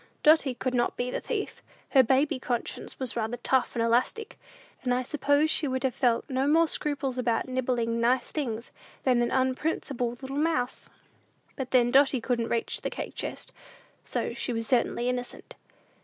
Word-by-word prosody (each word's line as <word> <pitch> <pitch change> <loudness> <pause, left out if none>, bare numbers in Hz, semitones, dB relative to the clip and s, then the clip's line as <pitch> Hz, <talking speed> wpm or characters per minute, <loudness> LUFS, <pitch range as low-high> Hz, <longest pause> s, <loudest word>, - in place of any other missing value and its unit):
Dotty 300 -4 +5
could 255 +1 -2
not 240 -1 +1
be 245 0 -1
the - - -3
thief. 420 -4 -4 0.3
Her 270 - +7
baby 265 +3 +2
conscience 245 -2 -4
was 260 -3 -3
rather 230 +1 -2
tough 255 +2 +1
and 230 - +1
elastic, 250 - 0 0.4
and 250 -1 +1
I 255 - 0
suppose 290 +2 +2
she 300 - +1
would 260 0 -2
have 260 -2 +1
felt 240 -3 +1
no 265 +1 0
more 325 +3 +5
scruples 280 -4 -2
about 235 -1 0
nibbling 245 -3 0
nice 245 +1 +2
things, 235 -6 -3 0.3
than 250 -2 +3
an 240 - +1
unprincipled 260 -2 -1
little 270 +1 -4
mouse. 300 -5 -1 0.7
But, 265 -3 -4
then 245 -2 +4
Dotty 270 0 +5
couldn't 235 -1 -1
reach 235 - -1
the - - -2
cake - - -6
chest; - - -5 0.5
so - - -2
she - - -3
was 225 0 -2
certainly 240 0 +1
innocent. 250 -1 -4
255 Hz, 170 wpm, -28 LUFS, 240-275 Hz, 0.7 s, Her